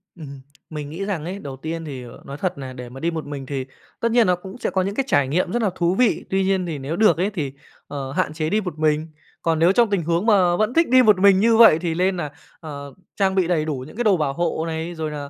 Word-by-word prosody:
Ừm, 140 Hz, -5 st, -10 dB, 0.3 s
mình 150 Hz, -2 st, -6 dB
nghĩ 175 Hz, +6 st, -5 dB
rằng 185 Hz, -7 st, -3 dB
ấy, 190 Hz, +3 st, -5 dB
đầu 140 Hz, -7 st, -7 dB
tiên 160 Hz, +3 st, -5 dB
thì 135 Hz, -4 st, -7 dB, 0.2 s
nói 140 Hz, +1 st, -7 dB
thật 185 Hz, -1 st, -2 dB
nà 130 Hz, -2 st, -7 dB
để 125 Hz, -1 st, -8 dB
mà 130 Hz, +2 st, -10 dB
đi 170 Hz, +3 st, -1 dB
một 160 Hz, -1 st, -5 dB
mình 145 Hz, -2 st, -6 dB
thì 135 Hz, -1 st, -4 dB, 0.3 s
tất 230 Hz, 0 st, 0 dB
nhiên 235 Hz, -3 st, +4 dB
nó 180 Hz, -, +3 dB
cũng 190 Hz, +5 st, -10 dB
sẽ -, -, -2 dB
có 190 Hz, -, 0 dB
những 195 Hz, +2 st, -2 dB
cái 270 Hz, -, 0 dB
trải 140 Hz, -, +2 dB
nghiệm 165 Hz, +7 st, 0 dB
rất 240 Hz, +1 st, 0 dB
là 210 Hz, -, +2 dB
thú 175 Hz, +1 st, +1 dB
vị, 250 Hz, +1 st, +2 dB
tuy 190 Hz, 0 st, +1 dB
nhiên 190 Hz, -1 st, +1 dB
thì 165 Hz, -3 st, -4 dB
nếu 140 Hz, +4 st, -4 dB
được 215 Hz, -1 st, +4 dB
ấy, 185 Hz, +4 st, +1 dB
thì, 155 Hz, -10 st, -4 dB, 0.4 s
ờ, 135 Hz, -2 st, -5 dB
hạn 145 Hz, -, -1 dB
chế 155 Hz, 0 st, -2 dB
đi 215 Hz, +3 st, +1 dB
một 175 Hz, -5 st, -6 dB
mình. 155 Hz, 0 st, +1 dB, 0.3 s
Còn 165 Hz, -1 st, 0 dB
nếu 170 Hz, +3 st, +5 dB
trong 235 Hz, +2 st, +3 dB
tình 200 Hz, -4 st, 0 dB
huống 170 Hz, +4 st, 0 dB
mà 190 Hz, -6 st, +4 dB
vẫn 215 Hz, +5 st, 0 dB
thích 335 Hz, -3 st, +3 dB
đi 255 Hz, 0 st, +6 dB
một 210 Hz, -5 st, +5 dB
mình 195 Hz, -1 st, +6 dB
như 225 Hz, +2 st, +4 dB
vậy 225 Hz, -9 st, +7 dB
thì 170 Hz, -2 st, -2 dB
lên 185 Hz, +2 st, +1 dB
nà, 150 Hz, -4 st, -4 dB, 0.3 s
ờ, 140 Hz, -3 st, -8 dB, 0.2 s
trang 195 Hz, -1 st, +1 dB
bị 185 Hz, -3 st, +2 dB
đầy 160 Hz, -4 st, +1 dB
đủ 140 Hz, -5 st, -3 dB
những -, -, -13 dB
cái 240 Hz, -, 0 dB
đồ 205 Hz, -5 st, +4 dB
bảo 145 Hz, -4 st, -1 dB
hộ 170 Hz, 0 st, -1 dB
này, 165 Hz, +1 st, -4 dB
rồi 155 Hz, -1 st, -4 dB
nà, 145 Hz, -1 st, -6 dB
170 Hz, 285 wpm, -22 LUFS, 150-195 Hz, 0.4 s, vậy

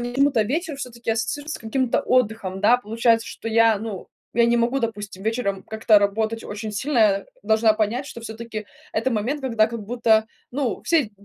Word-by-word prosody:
мне 240 Hz, 0 st, -3 dB
почему-то 270 Hz, -3 st, +3 dB
вечер 310 Hz, -, -2 dB
всё-таки 235 Hz, -4 st, -4 dB
ассоциируется 270 Hz, +8 st, -3 dB
с -, -, -19 dB
каким-то 245 Hz, +2 st, 0 dB
отдыхом. 220 Hz, -6 st, 0 dB
Да, 235 Hz, +4 st, +5 dB
получается, 230 Hz, 0 st, +1 dB
что -, -, -9 dB
я, 225 Hz, -1 st, +4 dB
ну, 210 Hz, -3 st, -6 dB, 0.2 s
я 235 Hz, +1 st, +4 dB
не 235 Hz, 0 st, +3 dB
могу, 240 Hz, +3 st, +1 dB
допустим, 205 Hz, -4 st, -4 dB
вечером 215 Hz, -3 st, -1 dB
как-то 220 Hz, -1 st, +3 dB
работать 220 Hz, +3 st, 0 dB
очень 215 Hz, +1 st, -6 dB
сильно. 255 Hz, +5 st, -1 dB
Я 200 Hz, -3 st, +3 dB, 0.2 s
должна 220 Hz, +1 st, +4 dB
понять, 220 Hz, +5 st, -1 dB
что 235 Hz, -, -8 dB
всё-таки 220 Hz, -1 st, -7 dB, 0.3 s
это 230 Hz, +3 st, 0 dB
момент, 240 Hz, +8 st, -1 dB
когда 230 Hz, -4 st, +2 dB
как 230 Hz, -1 st, -5 dB
будто, 220 Hz, -1 st, +2 dB, 0.2 s
ну, 255 Hz, -4 st, -2 dB
все 325 Hz, -5 st, +3 dB
д 215 Hz, -, -12 dB
225 Hz, 185 wpm, -23 LUFS, 215-245 Hz, 0.3 s, Да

